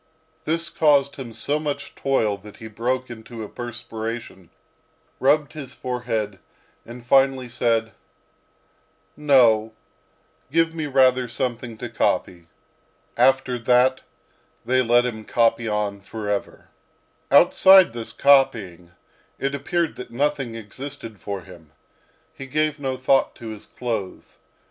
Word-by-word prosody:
This 165 +1 0
caused 140 -3 +2
him 130 -4 -7
so 145 +6 -2
much 145 -1 -4
toil, 115 -7 0
that 105 +1 -14
he 110 - -9
broke 125 +4 -2
into 115 0 -9
a - - -6
perspiration, 115 -6 -7 0.7
rubbed 145 +2 +2
his 145 -5 -8
forehead, 115 -5 -3 0.5
and 120 +1 -10
finally 135 0 +3
said, 115 -2 0 1.2
"No, 120 -7 +4 0.8
give 165 +1 +2
me 160 -2 -3
rather 130 -2 +3
something 120 -1 -4
to - - -5
copy." 85 -2 -1 0.7
After 130 0 +2
that 125 +2 +3 0.6
they 130 +1 +2
let 120 0 +3
him 110 -3 -4
copy 115 0 +1
on 105 -2 -2
forever. 105 0 -5 0.6
Outside 180 +2 +6
this 115 -1 -7
copying, 100 -12 +2 0.4
it 140 0 -2
appeared 160 +4 -1
that 125 - -8
nothing 135 -1 -1
existed 115 0 -8
for 100 -2 -5
him. 85 -4 -16 0.6
He 135 - -9
gave 155 +2 0
no 135 -2 -3
thought 130 +1 +2
to 115 -2 -8
his 110 -2 -9
clothes. 110 -6 -5
125 Hz, 120 wpm, -23 LUFS, 110-135 Hz, 1.2 s, Outside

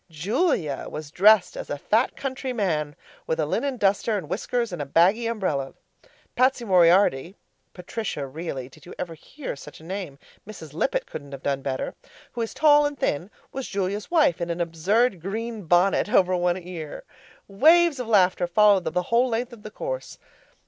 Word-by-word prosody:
Julia 165 - -1
was 150 -1 -7
dressed 205 +1 +5
as - - -7
a 145 - -3
fat 220 - +1
country 265 -1 -4
man 155 -10 -1 0.3
with 485 0 -1
a - - +2
linen 275 -2 -1
duster 205 +1 +1
and 175 -6 -6
whiskers 235 +5 -2
and 145 -5 -5
baggy 195 +8 +4
umbrella. 170 -12 -2 0.6
Patsy 255 -1 +2
Moriarty 180 -3 +4 0.4
(Patrici 180 -3 -4
really. 135 -2 -6
Did 130 - -18
you - - -10
ever 175 -2 -5
hear 260 - -8
such 150 +1 -12
a - - -16
name? 180 -5 -6 0.3
Mrs. 160 -9 -10
Lippett - - -1
couldn't 140 -2 -9
have 135 - -9
done 140 -1 -1
better) 135 -1 -3 0.4
who 240 - -5
is 225 - -4
tall 295 -1 +5
and 290 -1 -7
thin 170 - -1 0.2
was 270 -1 -5
Julia's 200 +1 -3
wife 300 - +3
in 170 - -2
a 170 +1 -1
absurd 185 +5 +1
green 220 +2 -5
bonnet 180 +5 +3
over 185 -1 +4
one 175 0 +1
ear. 175 -4 -8 0.4
Waves 315 - +4
of 250 - -4
laughter 185 -4 +3
followed 200 0 +4
them - - -3
the 180 - +1
whole 245 +2 +4
length 235 +1 -2
of 230 - -12
the 215 - -8
course. - - -6
195 Hz, 175 wpm, -24 LUFS, 165-235 Hz, 0.6 s, dressed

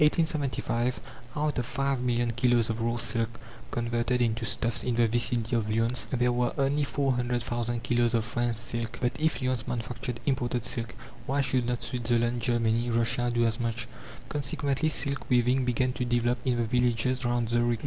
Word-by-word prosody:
In - - +8
1875, 140 -6 0 0.4
out 150 -2 0
of 120 - -2
five 135 -1 0
million 120 -1 +1
kilos 120 -1 +2
of 115 +1 -4
raw 115 +1 0
silk 115 -1 -2 0.3
converted 120 +1 0
into 115 -1 +1
stuffs 115 +1 0
in 125 - 0
the 120 0 +4
vicinity 120 +1 +2
of 110 -2 0
Lyons, 115 +3 +1
there 125 -2 +2
were 120 0 +1
only 140 +1 +2
four 140 -1 0
hundred 120 -1 -1
thousand 120 -1 -2
kilos 120 0 +2
of 115 -1 +1
French 120 0 -1
silk. 115 0 -4
But 125 -1 +1
if 155 -3 0
Lyons 125 -3 -1
manufactured 120 0 -4
imported 125 -3 0
silk, 115 -1 -2 0.3
why 140 +2 +1
should 130 -2 +1
not 120 -1 -1
Switzerland, 120 0 0
Germany, 115 0 +1
Russia, 115 +1 +1
do 120 0 +2
as 115 +1 0
much? 115 0 -2 0.4
Consequently, 140 +1 -1
silk 140 -5 -1
weaving 125 +1 +3
began 125 +1 +1
to 125 - -2
develop 120 0 +1
in 125 -2 +2
the 120 - +1
villages 125 +2 +1
round 120 -1 0
Zurich. 120 -1 +1
120 Hz, 180 wpm, -28 LUFS, 115-125 Hz, 0.4 s, In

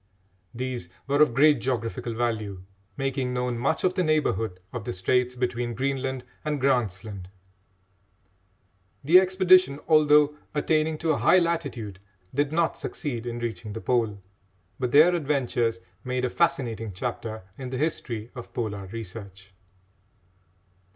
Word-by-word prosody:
These 125 -6 -4 0.2
were 140 +2 +2
of 140 -6 +4
great 145 -2 +5
geographical 115 -2 -2
value, 110 -5 -2 0.3
making 135 -2 -1
known 125 -1 -1
much 130 - 0
of 185 - +3
the 185 - 0
neighbourhood 115 - 0
of 120 -4 -4
the - - -4
straits 125 +7 +1
between 120 -1 -2
Greenland 130 0 -2 0.2
and 150 -1 -1
Grant's 120 -8 +1
Land. 100 -4 -8 1.7
The 165 +6 +8
expedition, 185 -5 +4
although 150 -1 +5 0.2
attaining 155 +1 +1
to 165 0 0
a 150 - +1
high - - +5
latitude, 140 - -1 0.3
did 145 +2 +1
not 165 +1 +1
succeed 120 -7 -4
in 120 0 -3
reaching 115 -2 -4
the 115 - -5
Pole, 115 -5 +1 0.6
but 125 -2 -1
their 155 +6 +7
adventures 130 - 0 0.2
made 125 0 -1
a 125 - -2
fascinating 115 - 0
chapter 110 0 -4
in 130 +1 -6
the 130 - -3
history 120 -6 -2
of 125 -3 -10
Polar 105 -5 -3
research. 100 -2 -9
125 Hz, 135 wpm, -26 LUFS, 115-150 Hz, 1.7 s, The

